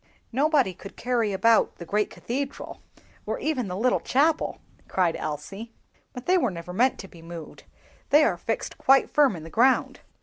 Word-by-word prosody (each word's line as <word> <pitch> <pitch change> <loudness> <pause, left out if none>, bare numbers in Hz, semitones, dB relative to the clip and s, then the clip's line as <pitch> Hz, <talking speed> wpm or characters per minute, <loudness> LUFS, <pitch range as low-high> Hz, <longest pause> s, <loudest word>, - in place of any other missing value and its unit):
"Nobody 275 - +2
could 195 +2 -12
carry 235 -4 0
about 220 +4 +3
the 170 - -9
great 210 +4 0
cathedral, 275 +3 -5 0.5
or - - -1
even 270 -8 -2
the 180 0 -4
little 245 +4 +2
chapel!" 305 +4 +1 0.3
cried 180 -3 +1
Elsie; 195 +9 -6 0.4
"but 250 - -9
they 365 0 +4
were 250 - +1
never 180 -1 -7
meant 250 +7 +2
to 195 - -11
be 170 -3 -15
moved, 165 -1 -10 0.4
they 300 +2 +6
are 200 - +2
fixed 225 +6 -4
quite 270 0 +4
firm 285 -8 +4
in 160 - -8
the 165 - -10
ground." 255 +3 +2
230 Hz, 175 wpm, -25 LUFS, 180-265 Hz, 0.5 s, they